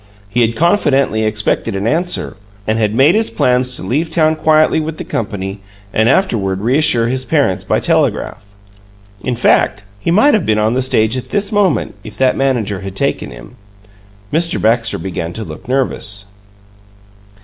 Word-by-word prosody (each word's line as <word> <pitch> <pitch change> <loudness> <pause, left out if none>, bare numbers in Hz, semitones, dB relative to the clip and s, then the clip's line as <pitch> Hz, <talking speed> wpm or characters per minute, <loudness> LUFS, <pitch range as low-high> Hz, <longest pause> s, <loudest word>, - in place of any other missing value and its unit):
He 120 +5 0
had 115 0 +1
confidently 140 - +2
expected 105 -2 -1
an 100 +1 -3
answer, 170 +4 -1 0.3
and 110 +1 0
had 105 -1 0
made 140 +7 +5
his 220 +2 +1
plans 125 0 +1
to - - -5
leave 145 - -1
town 155 -1 +2
quietly 155 0 +3
with 155 0 -4
the - - -5
company 100 -2 -4 0.3
and 110 +2 +2
afterward 100 - +1
reassure 120 -1 +2
his 130 +2 -1
parents 140 - 0
by - - 0
telegraph. 100 - 0 0.8
In 125 - -1
fact, 105 -3 +2 0.2
he 105 - -3
might 215 +12 +4
have 215 - +2
been 110 -6 +1
on 110 +2 +1
the 130 - 0
stage 120 -2 +2
at 125 - -7
this 205 0 -1
moment, 195 - +1
if 105 -1 -10
that 130 -1 +2
manager 120 -8 -1
had 95 0 -8
taken - - -1
him. - - -13 0.8
Mr. 165 +2 +2
Baxter 115 +1 +1
began 85 -3 -5
to 110 - -5
look 125 - -10
nervous. 115 -6 0
125 Hz, 170 wpm, -15 LUFS, 105-155 Hz, 0.8 s, made